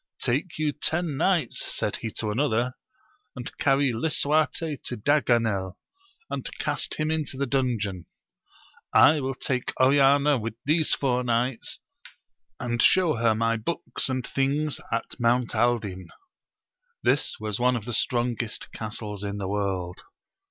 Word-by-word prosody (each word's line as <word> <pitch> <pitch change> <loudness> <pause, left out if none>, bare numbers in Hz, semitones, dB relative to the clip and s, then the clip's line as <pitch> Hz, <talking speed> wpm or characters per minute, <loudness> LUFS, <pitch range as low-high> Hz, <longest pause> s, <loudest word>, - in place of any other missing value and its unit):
Take 145 +8 -1
you 155 -1 +1
ten 160 +1 -1
knights, 170 -2 +1
said - - -1
he 115 - -4
to 110 -2 -2
another, 125 0 0 0.6
and 125 -2 -6
cany 135 -2 +3
Lisuarte 155 +3 0
to 125 - -3
Daganel, 115 -8 +1 0.5
and - - -4
cast - - -1
him 155 0 -1
into 155 -4 -2
the 140 - 0
dungeon. 115 -9 -1 0.9
I 155 0 +7
will 135 -1 -3
take 125 0 -2
Oriana 140 +1 +5
with 115 0 -5
these 155 +2 +4
four 125 -2 0
knights, 120 +1 -1 0.8
and 120 -1 -1
show 175 -8 +4
her 115 -1 +2
my 115 +1 +1
books 135 +4 -1
and 130 -1 -2
things 140 +2 0
at 115 +3 -3
Mount 120 +1 +2
Aldin: 105 -6 0 1.0
this - - +2
was 105 -1 -3
one 125 +1 +3
of 110 -3 -4
the 120 - -4
strongest 120 -2 -1
castles 105 -2 -3
in 100 0 -3
the 100 -2 -3
world. 95 -3 -2
125 Hz, 140 wpm, -26 LUFS, 110-140 Hz, 1.0 s, I